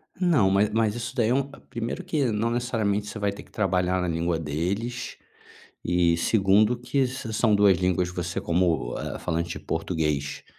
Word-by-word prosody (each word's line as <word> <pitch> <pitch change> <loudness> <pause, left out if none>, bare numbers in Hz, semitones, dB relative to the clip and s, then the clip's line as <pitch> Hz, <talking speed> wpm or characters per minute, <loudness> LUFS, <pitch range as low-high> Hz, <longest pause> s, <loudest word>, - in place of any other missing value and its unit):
Não 165 - +3
mas 100 +2 +3
mas 110 -1 +1
isso 120 +1 -5
daí 115 -2 +2
é 135 +2 -1
primeiro 120 +9 -4
que 160 -6 0
não 110 +2 0
necessariamente 110 -4 -1
você 105 - -6
vai 100 -1 0
ter 100 - -10
que - - -24
trabalhar 90 -2 +1
na 90 - -1
língua 85 0 0
deles, 95 +11 -3 0.7
e 85 -1 +2
segundo 105 +5 +3
que 130 +2 0
são 115 -3 0
2 100 -2 +5
línguas 90 -1 +1
que 90 - -13
você 90 0 -2
como 85 -8 0 0.3
falante 85 +1 -2
português, 75 -4 -2
100 Hz, 165 wpm, -25 LUFS, 85-115 Hz, 0.7 s, 2